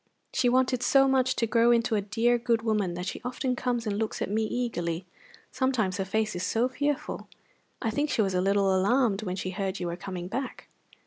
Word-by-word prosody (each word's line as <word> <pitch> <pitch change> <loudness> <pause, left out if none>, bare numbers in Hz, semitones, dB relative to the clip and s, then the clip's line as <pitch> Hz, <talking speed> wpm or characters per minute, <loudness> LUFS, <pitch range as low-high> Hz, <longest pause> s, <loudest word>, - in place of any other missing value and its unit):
She 255 -2 +3
wanted 255 0 +2
so 270 +1 +5
much 260 -1 +2
to 230 - +1
grow 230 +1 +3
into 235 0 +3
a 210 - +2
dear, 230 +4 +1
good 230 -1 +1
woman 210 -6 0
that 180 +1 -4
she - - -5
often 250 +1 -2
comes 245 -1 -1
and 205 -1 -1
looks 220 -1 -2
at - - -2
me 220 +1 +1
eagerly. 185 -8 -2 0.5
Sometimes 245 -8 0
her 195 - -1
face 215 +1 -1
is 175 - -3
so 230 +6 +1
fearful! 285 +2 -2 0.6
I 225 - +1
think 290 +6 0
she 220 - +2
was 190 -1 -1
a 180 - +2
little 195 0 +2
alarmed 210 +2 +2
when 185 -4 -3
she 185 0 -3
heard 195 0 -3
you 180 - -3
were 170 0 -2
coming 180 -1 -6
back." 260 +7 -5
220 Hz, 215 wpm, -28 LUFS, 195-250 Hz, 0.6 s, so